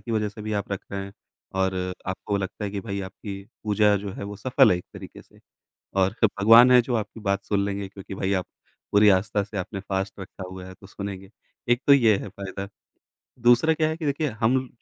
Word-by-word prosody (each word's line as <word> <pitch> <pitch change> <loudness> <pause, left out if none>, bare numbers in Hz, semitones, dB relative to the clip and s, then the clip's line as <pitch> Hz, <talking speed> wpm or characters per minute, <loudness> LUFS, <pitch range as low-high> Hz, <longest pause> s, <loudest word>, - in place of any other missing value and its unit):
की 120 - -8
वजह 105 -1 +1
से 105 +1 -10
भी 110 0 -4
आप 100 - -11
रख 100 - -3
रहे 100 0 -4
हैं। 100 - -10 0.4
और 95 0 +1 0.3
आपको 95 +2 -2
लगता 100 +2 -4
है 100 - -3
कि 100 -1 -4
भाई 100 -2 -3
आपकी 100 0 -8 0.2
पूजा 105 0 +3
जो 100 0 -5
है - - -7
वो 100 0 -7
सफल 130 +2 +4
है 90 - +3
एक - - -10
तरीके - - -10
से। - - -24 0.6
और 95 +1 +3
क - - +8
भगवान 115 +5 +8
हैं 125 -1 +8
जो 120 0 -2
आपकी 110 +1 -4
बात 100 -2 -1
सुन 100 -1 0
लेंगे, 100 -1 -3
क्योंकि 100 0 -10
भाई 95 +1 -1
आप 95 -2 0 0.5
पूरी 105 0 +6
आस्था 100 +1 +2
से 105 0 -8
आपने 95 +2 -4
फ़ास्ट 95 0 -3
रखा 95 0 -8
हुआ 95 0 -8
है, 95 - -10
तो 95 +1 -16
सुनेंगे, 95 -1 -7 0.4
एक 120 +2 +3
तो 140 - +9
ये 115 -6 +5
है 100 - -6
फ़ायदा। 100 +1 -7 0.8
दूसरा 120 +7 +5
क्या 155 0 +1
है 160 - -3
कि 160 - -5
देखिए 145 +1 0
हम 115 +3 +4
म 130 - -7
100 Hz, 235 wpm, -25 LUFS, 95-115 Hz, 0.8 s, तो